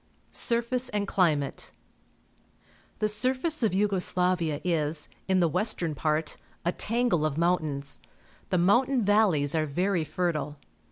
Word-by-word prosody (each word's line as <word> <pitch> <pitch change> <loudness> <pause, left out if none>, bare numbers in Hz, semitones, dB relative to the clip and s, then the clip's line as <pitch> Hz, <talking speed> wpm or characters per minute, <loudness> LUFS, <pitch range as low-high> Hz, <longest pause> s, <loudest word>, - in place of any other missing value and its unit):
Surface 240 +1 +2
and 205 -2 -2
Climate. 155 -9 0 0.6
— - - -34
The 215 - -1
siuface 255 +9 +1
of 220 -5 +1
Yugo 195 -1 +1
Sla\ia 180 -5 +1
is, 155 -3 0 0.2
in 190 -1 +2
the 170 - +4
western 180 -1 -1
part, 155 +2 -2 0.3
a 175 - +2
tangle 230 -6 0
of 155 -2 -1
mountains. 155 -5 0 0.5
The 185 - +1
mountain 240 +7 +2
valleys 190 -9 +3
are 155 -1 0
very 180 +4 0
fertile. 155 -2 -3
180 Hz, 130 wpm, -27 LUFS, 155-215 Hz, 0.6 s, the